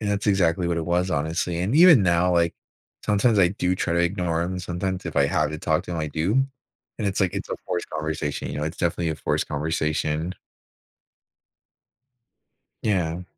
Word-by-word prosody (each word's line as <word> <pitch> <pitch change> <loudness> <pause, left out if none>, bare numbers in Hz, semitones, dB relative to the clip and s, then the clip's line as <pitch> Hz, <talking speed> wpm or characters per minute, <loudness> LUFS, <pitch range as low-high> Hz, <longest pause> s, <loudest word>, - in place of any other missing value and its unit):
And 105 -2 -1
that's 100 +1 -1
exactly 90 -3 +2
what 85 -1 0
it 85 - -2
was, 90 +2 0
honestly. 85 +2 -1
And 100 +9 0
even 165 - +8
now, 90 0 +3
like, 85 -1 +2 0.5
sometimes 105 +1 +3
I 90 -3 +5
do 90 -1 0
try 85 - -1
to 85 - +2
ignore 85 -2 0
him. 90 +1 -3
Sometimes 90 +1 -3
if 85 - -5
I 70 -1 +4
have 75 +1 +1
to 75 - -5
talk 80 0 0
to - - -6
him, 85 - -3
I 75 -1 -2
do. 80 +6 -1 0.7
And 105 - -1
it's 95 - -2
like, 95 -2 +1
it's - - -4
a - - -2
forced 90 - -3
conversation. 75 -2 -3
You - - -4
know? 75 - -1
It's 80 +2 -4
definitely 85 -1 -1
a - - -2
forced - - -1
conversation. 75 +2 -1 2.5
Yeah. 90 -4 0
85 Hz, 195 wpm, -24 LUFS, 80-95 Hz, 2.5 s, even